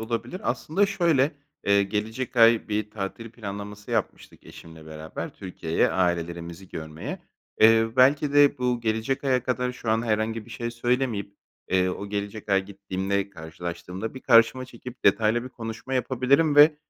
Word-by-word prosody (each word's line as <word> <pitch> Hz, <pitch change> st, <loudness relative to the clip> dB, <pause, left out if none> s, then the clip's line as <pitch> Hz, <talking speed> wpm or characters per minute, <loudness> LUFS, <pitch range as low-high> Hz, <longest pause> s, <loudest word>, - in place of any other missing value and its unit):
olabilir. 115 Hz, +11 st, -4 dB
Aslında 200 Hz, +6 st, +1 dB
şöyle, 165 Hz, -7 st, +2 dB, 0.3 s
eee, 100 Hz, 0 st, +5 dB
gelecek 110 Hz, +5 st, -3 dB
ay 115 Hz, -1 st, +5 dB
bir 105 Hz, 0 st, -2 dB
tatil 110 Hz, +3 st, -6 dB
planlaması 105 Hz, -1 st, -8 dB
yapmıştık 115 Hz, -3 st, -3 dB
eşimle 80 Hz, -1 st, -13 dB
beraber 80 Hz, 0 st, -7 dB
Türkiye'ye 85 Hz, -3 st, -1 dB
ailelerimizi 85 Hz, 0 st, -2 dB
görmeye. 80 Hz, -, -6 dB, 0.4 s
Eee, 115 Hz, +1 st, +6 dB
belki 140 Hz, +3 st, +4 dB
de 145 Hz, -2 st, +5 dB
bu 125 Hz, -1 st, 0 dB
gelecek 115 Hz, +5 st, -1 dB
aya 130 Hz, -2 st, +2 dB
kadar 125 Hz, 0 st, -1 dB
şu 120 Hz, -2 st, -4 dB
an 110 Hz, +1 st, +2 dB
herhangi 110 Hz, 0 st, -1 dB
bir 120 Hz, -, -16 dB
şey 120 Hz, +1 st, -4 dB
söylemeyip, 120 Hz, -4 st, -1 dB, 0.4 s
eee, 95 Hz, 0 st, +3 dB
o 100 Hz, +2 st, -4 dB
gelecek 105 Hz, +1 st, -5 dB
ay 95 Hz, -1 st, +2 dB
gittiğimde 100 Hz, 0 st, -3 dB
karşılaştığımda 85 Hz, +5 st, -6 dB
bir 130 Hz, -, -8 dB
karşıma 115 Hz, +1 st, +4 dB
çekip 125 Hz, 0 st, -11 dB
detaylı 110 Hz, +3 st, +3 dB
bir -, -, -6 dB
konuşma 115 Hz, +1 st, -6 dB
yapabilirim 130 Hz, +4 st, +2 dB
ve, 150 Hz, +1 st, +8 dB
110 Hz, 150 wpm, -25 LUFS, 100-125 Hz, 0.4 s, ve